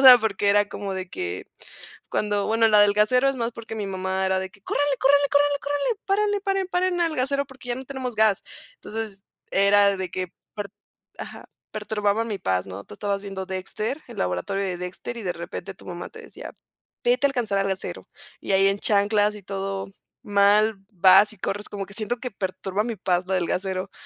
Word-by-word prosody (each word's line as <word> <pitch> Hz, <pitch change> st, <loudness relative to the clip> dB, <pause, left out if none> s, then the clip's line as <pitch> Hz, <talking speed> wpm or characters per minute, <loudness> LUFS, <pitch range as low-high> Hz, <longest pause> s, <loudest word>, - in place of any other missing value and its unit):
O -, -, +2 dB
sea, 255 Hz, -2 st, +11 dB
porque 205 Hz, -2 st, 0 dB
era 205 Hz, 0 st, +4 dB
como 200 Hz, -2 st, -4 dB
de 185 Hz, -1 st, -4 dB
que 90 Hz, -, -4 dB, 0.7 s
cuando, 205 Hz, -1 st, 0 dB
bueno, 225 Hz, 0 st, +4 dB
la 210 Hz, -1 st, +6 dB
del 205 Hz, 0 st, +6 dB
gasero 230 Hz, +6 st, +3 dB
es 275 Hz, -, 0 dB
más 235 Hz, -1 st, -2 dB
porque 225 Hz, -1 st, -8 dB
mi 210 Hz, -2 st, -3 dB
mamá 190 Hz, 0 st, -1 dB
era 190 Hz, 0 st, +2 dB
de 190 Hz, 0 st, -4 dB
que: 200 Hz, +1 st, -21 dB
"¡Córranle, 285 Hz, +6 st, 0 dB
córranle, 285 Hz, +1 st, +5 dB
córranle, 285 Hz, 0 st, +3 dB
córranle, 290 Hz, +11 st, -1 dB
párale, 410 Hz, +1 st, +1 dB
paren, 390 Hz, -2 st, 0 dB
paren 360 Hz, -1 st, +1 dB
al 330 Hz, -3 st, +1 dB
gasero 275 Hz, +2 st, +1 dB
porque 265 Hz, -2 st, -13 dB
ya 240 Hz, -, 0 dB
no 260 Hz, +1 st, -8 dB
tenemos 260 Hz, -3 st, -4 dB
gas!". 215 Hz, -2 st, +3 dB, 0.3 s
Entonces 210 Hz, -2 st, -6 dB, 0.3 s
era 200 Hz, 0 st, +5 dB
de 185 Hz, -2 st, -4 dB
que 185 Hz, 0 st, -3 dB, 0.3 s
per 205 Hz, -1 st, -4 dB, 0.5 s
ajá, -, -, -8 dB, 0.2 s
perturbaba 210 Hz, 0 st, 0 dB
mi 215 Hz, -3 st, -2 dB
paz, 95 Hz, 0 st, 0 dB
¿no? 95 Hz, +1 st, -8 dB
Tú -, -, -11 dB
estabas 200 Hz, -, -2 dB
viendo 195 Hz, -2 st, -5 dB
Dexter, 205 Hz, +9 st, -3 dB
El 235 Hz, -, -10 dB
Laboratorio 90 Hz, -, -1 dB
de 185 Hz, -2 st, -2 dB
Dexter, 180 Hz, +6 st, -6 dB
y 230 Hz, -, -6 dB
de 180 Hz, -3 st, -1 dB
repente 170 Hz, +3 st, -6 dB
tu 190 Hz, -, -17 dB
mamá 175 Hz, -1 st, -6 dB
te 450 Hz, -, -11 dB
decía: 455 Hz, -, -10 dB, 0.5 s
"Vete 250 Hz, +3 st, +3 dB
a -, -, +3 dB
alcanzar 240 Hz, -7 st, -1 dB
al 195 Hz, 0 st, +1 dB
gasero". 190 Hz, -1 st, -4 dB, 0.3 s
Y -, -, -3 dB
ahí 195 Hz, 0 st, +5 dB
en 195 Hz, 0 st, +2 dB
chanclas 205 Hz, +1 st, +3 dB
y 205 Hz, -, -11 dB
todo 195 Hz, 0 st, -3 dB, 0.4 s
mal, 205 Hz, +2 st, +4 dB, 0.2 s
vas 190 Hz, +3 st, +6 dB
y 215 Hz, -, -14 dB
corres, 205 Hz, +2 st, -3 dB
como 200 Hz, -1 st, -5 dB
que 200 Hz, -, -10 dB
siento 225 Hz, +3 st, -1 dB
que 250 Hz, 0 st, -6 dB
perturba 190 Hz, +1 st, -2 dB
mi 230 Hz, 0 st, -3 dB
paz 180 Hz, -2 st, +1 dB
lo 190 Hz, -, +1 dB
del 180 Hz, -2 st, +1 dB
gasero. 190 Hz, +1 st, -2 dB
205 Hz, 210 wpm, -24 LUFS, 190-245 Hz, 0.7 s, sea